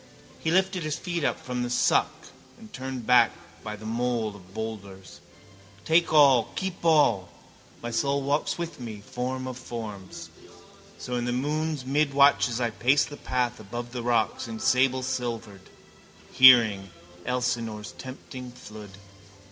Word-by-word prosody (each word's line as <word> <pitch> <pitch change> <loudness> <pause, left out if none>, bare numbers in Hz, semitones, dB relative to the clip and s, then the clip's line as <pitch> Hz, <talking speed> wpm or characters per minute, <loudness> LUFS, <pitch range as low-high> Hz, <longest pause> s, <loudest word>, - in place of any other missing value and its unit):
He 160 - -2
lifted 190 +1 +2
his 155 0 -3
feet 175 -3 -3
up - - 0
from 125 -1 -4
the 120 - -2
suck 125 - +1 0.3
and 220 -2 -15
turned 130 -2 -6
back 125 +1 +6 0.3
by 105 -1 -5
the 110 +1 -12
mole 115 -2 -1
of 90 -2 -16
boulders. 100 -4 -7 0.7
Take 165 +1 +3
all, 140 -7 +5
keep 190 -2 -4
all. 145 - +3 0.5
My 120 - -4
soul 140 +4 0
walks 145 +2 0
with 170 -3 -5
me, 110 -4 -8
form 130 +1 -4
of 130 -1 -6
forms. 110 -6 -8 0.7
So 125 0 -4
in 120 - -2
the 120 - -1
moon's 150 +3 -2
midwatches 140 -3 +3
I 120 -2 0
pace 125 +7 +2
the 145 - -9
path 125 -4 -2
above 120 +3 -7
the 125 -1 -4
rocks, 115 -3 0
in 110 -1 -6
sable 130 +1 +2
silvered, 115 -6 -4 0.6
hearing 115 -7 +6 0.4
Elsinore's 115 -4 -2
tempting 130 -1 -9
flood. 105 -5 -12
125 Hz, 145 wpm, -26 LUFS, 110-140 Hz, 0.7 s, back